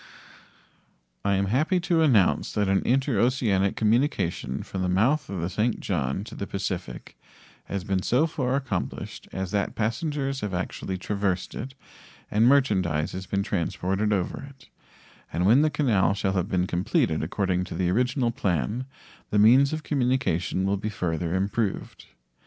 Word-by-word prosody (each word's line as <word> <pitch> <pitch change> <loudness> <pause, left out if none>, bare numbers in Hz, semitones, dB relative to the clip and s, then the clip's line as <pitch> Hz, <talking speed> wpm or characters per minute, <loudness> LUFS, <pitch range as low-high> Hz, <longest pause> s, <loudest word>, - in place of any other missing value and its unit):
I 100 0 +2
am 100 +1 +1
happy 150 - +1
to 170 -1 +2
announce 120 - +3
that 105 -1 +1
an 95 0 +2
interoceanic 120 -6 +2
communication 110 - 0
from 95 - -5
the 90 - 0
mouth 115 +12 +2
of 95 -3 -4
the 85 - -1
St. 110 +5 0
John 70 +9 -2
to 110 - -10
the 100 - -5
Pacific 90 -9 -5 0.5
has 100 -2 -4
been 95 -1 0
so 125 +10 +2
far 130 -5 -1
accomplished 130 -10 -4
as 95 -1 -4
that 100 -1 -1
passengers 135 +4 -2
have 100 -3 -3
actually 90 +1 -3
traversed 95 -1 -2
it 130 0 -6 0.6
and 110 +3 +4
merchandise 95 - +2
has 95 0 -6
been 100 0 0
transported 95 +1 -1
over 95 -4 -1
it, 135 -2 -14 0.6
and 90 +2 0
when 120 +8 +6
the 155 - +3
canal 110 -11 +2
shall 95 -1 -1
have 95 0 -1
been 90 -3 +1
completed 85 -3 0
according 90 +2 -1
to 90 - -7
the 90 0 +1
original 125 +3 +1
plan 105 - -1 0.4
the 105 - 0
means 125 +7 +6
of 155 0 -3
communication 120 - 0
will 100 +1 +1
be 105 +2 -3
further 85 -3 -2
improved. 100 +2 -2
100 Hz, 160 wpm, -26 LUFS, 95-125 Hz, 0.6 s, when